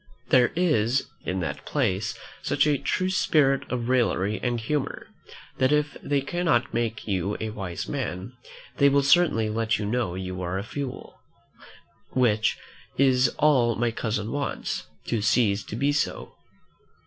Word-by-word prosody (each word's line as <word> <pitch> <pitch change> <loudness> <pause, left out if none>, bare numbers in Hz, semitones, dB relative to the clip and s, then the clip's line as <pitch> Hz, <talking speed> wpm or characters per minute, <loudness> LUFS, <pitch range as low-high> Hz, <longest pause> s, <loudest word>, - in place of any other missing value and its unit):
There 125 -2 +5
is 135 -8 +2 0.2
in 95 0 -1
that 85 - -4
place 95 +2 -1 0.2
such - - +2
a 145 -3 +2
true 185 0 0
spirit 140 -7 +2
of 120 -2 -2
raillery 110 -5 +1
and 120 -1 -1
humour, 140 +5 -2 0.5
that 130 +1 +3
if 150 0 +1
they 140 -1 0
cannot 140 -5 0
make 115 -1 -2
you 100 0 -1
a 110 -1 -3
wise 95 -5 -5
man, 95 +7 -4 0.4
they 140 - +6
will 140 0 +3
certainly 140 -7 +4
let 110 +1 0
you 105 - -3
know 110 -4 -1
you 95 0 -5
are 90 +1 -2
a 95 - -3
fool; 135 +3 -7 0.9
which 110 -4 +2 0.4
is 130 -2 +4
all 125 -6 +3
my 120 0 0
cousin 110 -1 -2
wants, 145 -1 -3 0.2
to 115 -3 -1
cease 105 -2 +2
to - - -6
be 140 +5 +1
so. 145 0 -2
120 Hz, 150 wpm, -26 LUFS, 105-140 Hz, 0.9 s, they